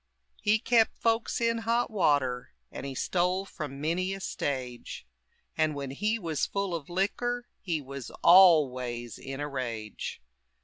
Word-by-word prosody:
He 210 +1 +4
kept 230 0 +3
folks 230 0 +1
in 230 0 +1
hot 230 +1 0
water, 140 - +1 0.2
And 140 - -6
he 135 - -6
stole 180 +5 0
from 150 -7 -7
many 180 +5 0
a - - -8
stage; 130 - -4 0.5
And 155 -1 +1
when 140 -2 -4
he 210 +10 0
was 165 -8 -1
full 200 -2 -2
of 165 -3 -5
liquor 240 +7 -1
He 165 -5 -2
was 135 -2 -7
always 130 - +5
in 135 0 -6
a 145 - -2
rage. 115 -6 -5
160 Hz, 145 wpm, -29 LUFS, 135-200 Hz, 0.5 s, always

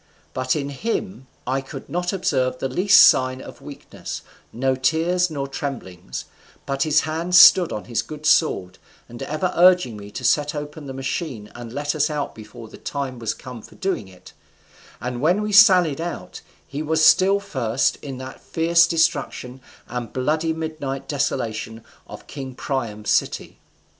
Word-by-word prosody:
But 130 0 0
in 140 -2 -2
him 185 - -4 0.2
I 130 +2 -1
could 135 0 -9
not 175 +1 -2
observe 130 -9 0
the 135 - -2
least 190 +9 +5
sign 130 0 +3
of - - -11
weakness, - - -8 0.3
no 130 +3 0
tears 165 +7 +1
nor 140 -3 -4
tremblings, 95 - -6 0.4
but 135 -1 -3
his 155 0 +3
hand 165 +3 -2
still 175 0 +8
on 105 - -5
his 120 -2 -1
good 155 0 -9
sword, 95 - +2 0.3
and 120 0 -11
ever 165 +5 -2
urging 180 -10 +4
me 100 0 -10
to - - -7
set 150 0 +2
open 150 0 -7
the 135 - -6
machine 130 - -4
and 120 -1 -9
let 145 +3 -2
us 155 0 +1
out 150 -2 -3
before 110 +1 -11
the - - -14
time 135 -3 -4
was 115 -2 -2
come 125 -3 -10
for - - -16
doing 190 - -2
it; 95 -1 -16 0.7
and 125 0 -4
when 180 +8 +2
we 210 - -2
sallied 185 -8 +6
out 165 - -6 0.2
he 140 +2 -5
was 155 +1 +2
still 195 +2 +5
first 130 - -1
in 135 -3 -8
that 130 0 -9
fierce 170 +1 +3
destruction 160 -6 -1 0.3
and 120 -1 -5
bloody 155 +5 0
midnight 155 -4 -4
desolation 115 -6 -3 0.2
of - - -11
king 135 -3 -8
Priam's 115 -7 -3
city." - - -1
140 Hz, 165 wpm, -22 LUFS, 125-160 Hz, 0.7 s, still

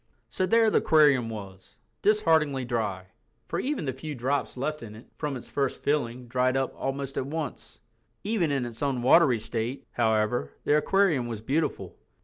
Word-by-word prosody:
So 185 - -1
there 225 0 +4
the - - +4
aquarium 145 -7 +4
was, 95 -4 -9 0.3
dishearteningly 160 -10 +2
dry—for 100 -6 -5
even 275 - -2
the 130 - -2
few 145 +4 -6
drops 130 +2 -2
left 150 +4 -3
in 105 -2 -9
it 115 - -13
from 145 -3 -3
its 120 - -11
first 140 -2 -2
filling 125 -4 -1
dried 130 +2 +1
up 135 -1 -1
almost 135 0 -4
at 130 - -1
once. 155 -2 -6 0.4
Even 200 -7 0
in 135 -3 0
its 115 -1 -8
unwatery 130 -1 +4
state, 120 +5 -4
however, 110 -11 0
the 145 - +3
aquarium 160 -5 +2
was 115 -3 -5
beautiful. 140 +8 -2
135 Hz, 160 wpm, -27 LUFS, 120-150 Hz, 0.4 s, there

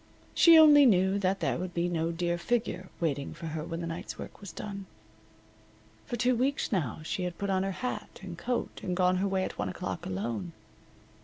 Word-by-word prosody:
She 335 -1 +8
only 295 -3 +8
knew 190 -2 +3
that 195 0 0
there - - 0
would 180 0 -5
be 170 0 +1
no 165 -1 -1
dear 170 0 -1
figure 220 -4 -1
waiting 145 -4 -2
for 165 0 -8
her 160 -1 -4
when 165 +1 -5
the - - -3
night's 165 0 -6
work - - -9
was 200 - -8
done. 200 -2 -7 1.2
For - - -3
two 245 +2 +2
weeks 265 +4 0
now 160 - -1
she 170 - -3
had 180 -1 -3
put 200 -1 -2
on 190 -1 +2
her 195 - -1 0.2
hat 250 - -5
and 180 -3 -6
coat 240 +7 -3
and 180 -2 -3
gone 185 0 +3
her 195 +2 +1
way 190 -1 0
at - - -5
one 100 - -1
o'clock 90 0 -5
alone. 95 -2 -3
185 Hz, 210 wpm, -29 LUFS, 165-200 Hz, 1.2 s, She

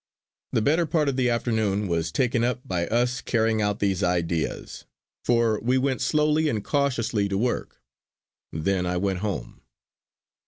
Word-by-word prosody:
The 110 - +1
better 160 +5 +2
part 155 -3 +1
of 135 - -2
the 125 -1 +2
afternoon 110 -4 0
was 85 -2 -1
taken 125 +3 +1
up 125 +1 -1
by 85 -2 -1
us 125 +3 0
carrying 110 -2 +1
out 105 -1 0
these 95 -3 0
ideas, 85 -2 -2 0.4
for 115 -3 +2
we 125 +4 +1
went 130 0 0
slowly 150 0 +2
and 110 -6 -2
cautiously 115 -8 0
to 95 - -1
work. 120 +4 -2 0.7
Then 90 +3 -1
I 90 0 -1
went 95 0 -1
home. 105 -1 -4
110 Hz, 155 wpm, -25 LUFS, 95-125 Hz, 0.7 s, better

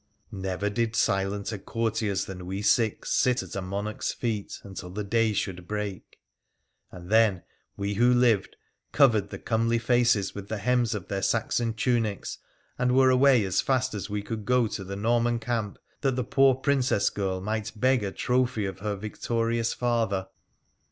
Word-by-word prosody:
Never 95 0 -3
did 115 +2 -1
silenter 100 +1 0
courtiers 110 -1 -1
than 90 -2 -8
we 95 +2 -4
six 110 0 +1
sit 125 +1 +2
at - - -9
a 100 - -2
monarch's 100 +3 -3
feet 110 -4 -3
until 95 -2 -8
the 105 +4 -4
day 115 +2 +2
should 90 -4 -3
break; 105 -3 -5 0.7
and 90 +1 -11
then 110 -5 +4 0.3
we 100 0 -2
who 120 +4 +4
lived 120 -5 +2 0.4
covered 110 -8 +4
the - - -6
comely 115 +1 0
faces 120 -4 +2
with 100 -1 -7
the 110 - -3
hems 120 +1 +1
of 90 -4 -6
their 100 -1 -2
Saxon 115 +1 0
tunics, 110 -3 -1 0.4
and 125 0 +2
were 130 -1 +6
away 130 -2 +5
as 95 - +1
fast 130 -1 0
as 105 0 -5
we 105 0 -3
could 110 0 -5
go 125 +1 +3
to 105 -2 -4
the 95 +1 -6
Norman 120 +3 +1
camp, 115 -3 -3 0.2
that 135 -3 0
the 125 - -1
poor 135 +2 +4
Princess 130 -5 +1
girl 95 -2 -2
might 110 +2 -3
beg 130 -1 +3
a 100 - -2
trophy 125 -2 0
of 95 -1 -5
her 105 0 -2
victorious 115 +3 -1
father. 115 -6 -1
110 Hz, 170 wpm, -27 LUFS, 100-120 Hz, 0.7 s, were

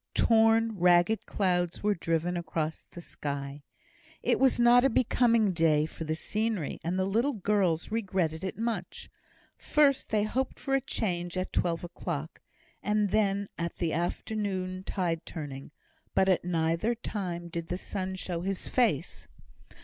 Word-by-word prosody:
Torn, 225 -1 +4
ragged 175 +4 +4
clouds 175 -3 0
were 210 0 +3
driven 165 0 -1
across 160 -2 -3
the 175 - -10
sky. 140 -2 -5 0.6
It - - +2
was 265 -2 +3
not 240 +1 +6
a 270 - +5
becoming 230 -3 +3
day 155 -3 +3
for 160 +1 -7
the 155 0 -1
scenery, 215 -1 -2
and 175 +3 -1
the 185 - +1
little 230 +9 +1
girls 195 -5 +1
regretted 190 -7 -1
it 190 - -4
much. 230 +1 -4 0.4
First 285 -3 +2
they 210 -1 +2
hoped 260 +5 -2
for 270 - -3
a 270 - +3
change 175 -6 -2
at 185 - -3
twelve 170 -1 0
o'clock, 165 -3 -5 0.4
and 210 -2 +1
then 200 -2 +1
at 170 0 -3
the 165 -2 -1
afternoon 185 +1 -2
tide 170 -4 -1
turning. 140 -4 -7 0.5
But 190 - +4
at 185 - +3
neither 170 +6 0
time 180 -6 -4
did 170 -1 -5
the 180 - -2
sun 190 -1 -4
show 180 -2 -4
his 195 +1 -3
face. 245 -2 0
185 Hz, 150 wpm, -29 LUFS, 170-220 Hz, 0.6 s, not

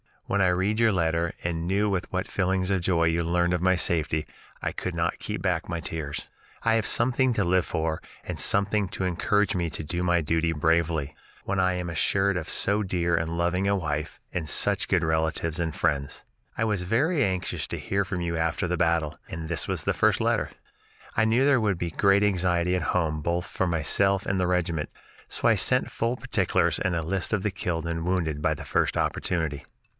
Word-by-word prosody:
When 100 +1 0
I 95 - +4
read 95 +5 +1
your 115 -2 +4
letter 85 -1 0
and 85 0 -2
knew 100 +3 +1
with 95 -3 -2
what 95 +1 -1
feelings 95 -1 0
of 95 -2 +1
joy 85 -1 +2
you 85 +1 +2
learned 85 +1 +1
of 90 - 0
my 95 0 +4
safety, 80 -3 0 0.4
I - - -1
could 90 -2 -4
not 85 0 -1
keep - - -4
back - - 0
the 85 -1 -3
tears. 75 -2 -5 0.4
I 115 - +3
have 110 -1 +1
something 130 +1 +2
to 105 - +1
live 90 -1 +2
for 80 -1 -2 0.2
and - - -5
something 100 0 +3
to - - -4
encourage 100 +4 +1
me 85 -2 0
to 80 - -3
do 85 +3 -3
my 90 -1 +2
duty 80 +1 0
bravely, 80 -2 +1 0.3
when 100 0 -1
I 90 0 +3
am 90 -1 -3
assured 95 +4 +2
of 80 -2 -4
so 100 +2 +2
dear 90 -3 0
and 85 0 0
loving 90 +3 +1
a 100 - +3
wife 75 -5 -3
and 85 -3 -2
such - - +1
good - - +2
relatives 80 +1 0
and 80 -2 -2
friends. 70 -4 -1 0.3
I - - +1
was 105 -4 0
very 140 - +2
anxious 95 -3 -1
to - - -4
hear 100 0 -1
from 90 -2 -3
you 85 -1 -2
after 85 +2 -1
the 90 - 0
battle, 80 -2 0
and 80 -1 -6
this 85 -2 -1
was - - -2
the - - +1
first - - +2
letter. - - +1 0.7
I 110 - +3
knew 115 +4 +3
there 140 -4 +4
would 105 -4 +1
be 85 -1 -3
great 100 +3 +3
anxiety 90 -3 +1
at 90 - 0 0.2
home 80 -3 0
both 85 +3 -1
for 95 - -1
myself 95 +4 +1
and 95 -1 0
the 90 - +1
regiment, 85 -4 0 0.4
so - - 0
I - - +5
sent - - +2
full 115 +2 -1
particulars - - 0
and 90 -3 0
list 95 +5 -2
of 100 -3 0
the 105 - 0
killed 85 -4 -3
and 85 0 -3
wounded 85 -5 -1
by - - +2
the - - -9
first - - +1
opportunity." 80 -5 -1
90 Hz, 210 wpm, -26 LUFS, 80-95 Hz, 0.7 s, I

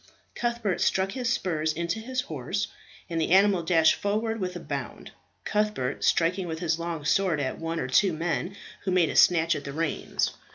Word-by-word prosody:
Cuthbert 235 -5 -1
struck 190 +1 +2
his 245 +1 -1
spurs 160 -8 0
into 170 +5 -2
his 255 +3 -2
horse, 160 - -3 0.4
and 165 -1 -2
the - - 0
animal 195 0 +5
dashed 165 -2 +4
forward 220 +2 -1
with 180 -2 -3
a - - -4
bound, 140 -5 -6 0.3
Cuthbert 210 -11 -1
striking 175 +2 +2
with 160 -1 -4
his 165 -1 -1
long 165 -3 -4
sword 175 +1 +2
at 130 -2 -2
one 165 0 -3
or - - -2
two 185 +9 +4
men 170 +4 -2 0.3
who 195 - -2
made 180 -3 +3
a - - -4
snatch 165 -1 +5
at 145 - -5
the 140 - -6
reins. 160 0 -1
175 Hz, 190 wpm, -27 LUFS, 160-200 Hz, 0.4 s, animal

